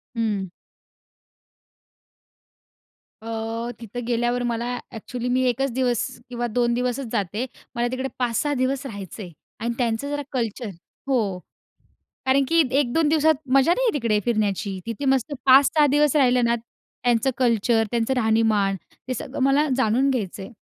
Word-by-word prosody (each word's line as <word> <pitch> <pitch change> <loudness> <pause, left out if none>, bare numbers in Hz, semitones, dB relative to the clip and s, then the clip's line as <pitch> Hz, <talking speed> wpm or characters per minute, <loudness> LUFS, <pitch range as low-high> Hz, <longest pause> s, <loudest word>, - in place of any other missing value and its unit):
हं. 210 -5 -1 2.7
अ, 225 +1 -4
तिथे 235 +1 -6
गेल्यावर 240 +1 0
मला 235 -1 -1 0.3
ॲक्चुअली 240 +2 -5
मी 255 +1 +2
1 265 +2 0
दिवस 245 -2 +1 0.3
किंवा 240 -1 -2
2 235 +1 +1
दिवसच 250 +2 -1
जाते. 210 +2 -1 0.3
मला 240 +1 +1
तिकडे 260 +1 -2
5-6 250 +4 0
दिवस 260 +1 -1
राहायचंय 200 - -7 0.3
आणि 235 +2 -1
त्यांचं 240 +2 -1
जरा 290 0 -2
कल्चर 235 -3 -2 0.4
हो. 215 -9 0 0.9
कारण 270 +1 +4
की 330 +1 +5 0.2
1-2 295 +4 +1
दिवसात 315 +1 +4 0.2
मजा 275 +5 +5
नाही - - 0
येत 455 - +1
तिकडे 230 -6 +1
फिरण्याची. 205 -4 0
तिथे 230 +4 -4
मस्त 270 +1 +1
5-6 280 +3 +6
दिवस 295 +1 +3
राहिलं 250 -3 +4
ना, 235 0 +3
त्यांचं 235 +1 -2
कल्चर, 230 -2 +2
त्यांचं 235 +2 0
राहणीमान 220 -4 +2 0.3
ते 255 - -1
सगळं 270 +2 -6
मला 275 +3 +3
जाणून 260 +2 +2
घ्यायचंय. 200 -5 -3
240 Hz, 135 wpm, -23 LUFS, 225-270 Hz, 2.7 s, 5-6